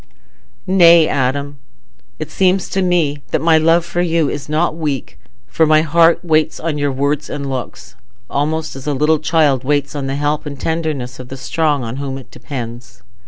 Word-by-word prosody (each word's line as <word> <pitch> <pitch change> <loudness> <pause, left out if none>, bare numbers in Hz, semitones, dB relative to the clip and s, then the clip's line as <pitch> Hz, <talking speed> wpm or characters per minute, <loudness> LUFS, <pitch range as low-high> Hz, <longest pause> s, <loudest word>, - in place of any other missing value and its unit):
"Nay, 170 -4 +6
Adam. 140 +2 -1 0.6
It 155 0 -6
seems 185 -1 +1
to 195 - -1
me 165 -6 +1
that - - 0
my 160 +1 +4
love 165 +2 +3
for 175 - -2
you 165 -4 +1
is 145 0 -6
not 155 +1 0
weak, 150 -5 -4 0.3
for 155 +11 +1
my 155 0 +4
heart 165 +2 +3
waits 155 -1 +1
on 155 -2 -3
your 145 -1 0
words 140 +2 -1
and 140 -1 -4
looks, 125 -6 -6 0.3
almost 155 +4 -2
as 135 +1 -9
a 145 - 0
little 150 +3 +2
child 150 -4 +2
waits 145 0 0
on 140 -2 -4
the 135 - -2
help 145 +1 -1
and 140 -2 -7
tenderness 155 -7 -3
of 130 - -8
the 135 - -8
strong 145 +1 0
on 115 +2 -5
whom 135 -1 -4
it 135 - -13
depends. 120 -7 -8
150 Hz, 185 wpm, -17 LUFS, 135-160 Hz, 0.6 s, Nay